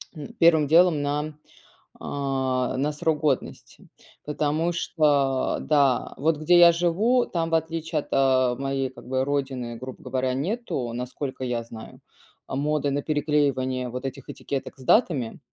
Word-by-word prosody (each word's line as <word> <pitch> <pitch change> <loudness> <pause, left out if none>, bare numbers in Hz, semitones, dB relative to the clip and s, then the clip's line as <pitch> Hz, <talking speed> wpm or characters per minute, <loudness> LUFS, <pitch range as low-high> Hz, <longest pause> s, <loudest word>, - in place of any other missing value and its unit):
м, 150 -3 -7
первым 160 -3 +5
делом 165 0 +4
на 150 +2 -2 0.7
а, 130 -2 -2
на 145 +3 0
срок 155 0 -1
годности, 145 -4 -3 0.4
потому 150 +3 0
что 145 -6 +1
да, 140 -4 +1
вот 155 +3 +1
где 155 +4 +4
я 170 0 +8
живу, 190 +9 +2
там 165 -1 -2
в - - +3
отличие 160 0 -2
от, - - -8
а, 130 -2 +3
моей 135 0 -2
как 130 - -14
бы 130 0 0
родины, 135 -4 -3
грубо 130 +2 -9
говоря, 130 0 -1
нету, 145 - -3
насколько 130 +2 -5
я 120 -2 -2
знаю, 115 -1 -12 0.5
а, - - -5
моды 145 +1 0
на 140 +1 -2
переклеивание 140 -4 0
вот 125 +2 -6
этих 135 0 -6
этикеток 140 0 -5
с - - -11
датами. 140 - +2
140 Hz, 150 wpm, -25 LUFS, 130-155 Hz, 0.7 s, я